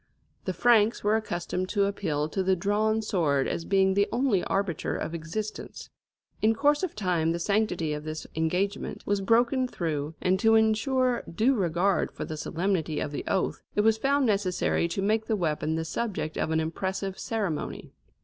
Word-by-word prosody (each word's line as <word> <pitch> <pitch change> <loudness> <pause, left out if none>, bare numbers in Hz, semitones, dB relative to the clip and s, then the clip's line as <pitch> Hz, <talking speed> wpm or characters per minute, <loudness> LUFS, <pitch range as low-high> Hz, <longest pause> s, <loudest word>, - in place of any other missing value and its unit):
The 185 - -1
Franks 225 0 +3
were 210 +1 +3
accustomed 185 -3 -2
to 200 -2 +2
appeal 160 -7 -1
to 190 - -1
the 190 0 +2
drawn 215 +4 +1
sword 150 -10 +1
as 165 - -3
being 190 -1 +3
the 200 +1 +2
only 240 -6 +1
arbiter 195 -5 -1
of 165 - -4
existence. 170 +7 -6 0.5
In 220 +1 +3
course 290 +5 +3
of 370 -4 -3
time 175 -5 +1
the - - -1
sanctity 180 -4 0
of 150 0 -5
this 155 0 -5
engagement 180 +6 -1
was 205 -1 0
broken 240 +5 +3
through, 155 -7 -3
and 185 +1 +1
to 225 +2 +5
ensure 235 +3 +2
due 225 +10 +3
regard 185 -2 +1
for - - -6
the 155 - -5
solemnity 160 -1 -1
of 150 - -3
the 145 - -4
oath, 190 - 0
it 210 - +4
was 220 +1 +3
found 280 +2 +2
necessary 195 -5 +1
to 190 +3 -3
make 220 +2 +1
the 220 - +1
weapon 160 -4 -1
the 160 0 -2
subject 160 -4 -3
of - - -1
an 160 0 +1
impressive 190 +4 -3
ceremony. 200 -9 -3
195 Hz, 180 wpm, -27 LUFS, 165-220 Hz, 0.5 s, to